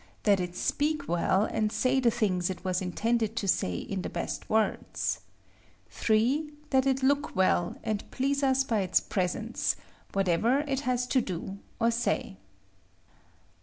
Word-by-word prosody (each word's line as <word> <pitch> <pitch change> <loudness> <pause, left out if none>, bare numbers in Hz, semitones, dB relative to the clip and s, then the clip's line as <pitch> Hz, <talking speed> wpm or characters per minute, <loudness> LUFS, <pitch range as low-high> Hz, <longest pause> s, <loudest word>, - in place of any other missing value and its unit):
That 200 -2 +4
it 180 -1 -3
speak 290 +4 0
well, 180 +3 +2
and 215 -1 0
say 255 +3 +2
the 245 -2 +4
things 195 -7 0
it 185 0 -6
was 185 0 0
intended 225 +4 0
to 200 - -2
say 90 - +1
in 190 - -4
the - - -4
best - - -4
words. 220 0 0 0.7
3. 255 +8 +1 0.2
That 265 -1 +3
it 265 0 +1
look 285 +2 +1
well, 185 -2 +2
and 215 -3 -1
please 275 +2 0
us 270 -1 +3
by 230 -5 0
its 185 -2 +3
presence, 205 +5 -1 0.4
whatever 195 +8 +2
it 275 -3 -1
has 250 0 +1
to 255 +1 +2
do 190 0 -5 0.2
or 230 0 +3
say. 230 - -1
220 Hz, 155 wpm, -29 LUFS, 190-265 Hz, 0.7 s, That